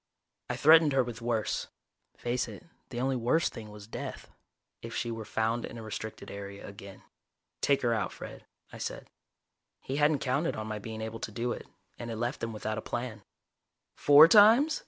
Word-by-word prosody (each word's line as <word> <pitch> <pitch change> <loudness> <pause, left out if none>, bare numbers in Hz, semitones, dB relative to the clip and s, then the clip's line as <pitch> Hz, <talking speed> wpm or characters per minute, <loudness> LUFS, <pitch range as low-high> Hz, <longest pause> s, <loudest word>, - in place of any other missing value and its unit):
I - - -1
threatened 160 -1 +6
her 135 -1 +4
with 120 -3 -7
worse 115 -2 -1 0.5
face 120 +1 -1
it, - - -10 0.2
the 120 - -5
only 130 +1 +1
worse 130 +6 +2
thing 110 -2 -9
was 105 -1 -11
death 110 - -7 0.5
if - - -7
she 120 - -2
were 115 -1 -5
found 115 +2 0
in - - -7
a 115 - -7
restricted 110 0 -6
area 100 0 -8
again. 100 -1 -11 0.6
"Take 140 -2 +2
her 120 -1 +3
out, 110 -3 -1
Fred," - - -9 0.3
I - - -9
said. - - -6 0.7
He 135 - -4
hadn't 150 0 +4
counted 140 +5 0
on 110 - -4
my 110 -1 -4
being 110 +1 -7
able 110 +1 -5
to 110 - -5
do 120 +3 -2
it, - - -6 0.3
and 120 - -5
it 115 - -3
left 120 +5 -3
him 115 - -2
without 110 0 -3
a - - -6
plan. 120 -3 -4 0.7
"Four 145 +2 +8
times?" 225 - +6
120 Hz, 190 wpm, -30 LUFS, 110-135 Hz, 0.7 s, Four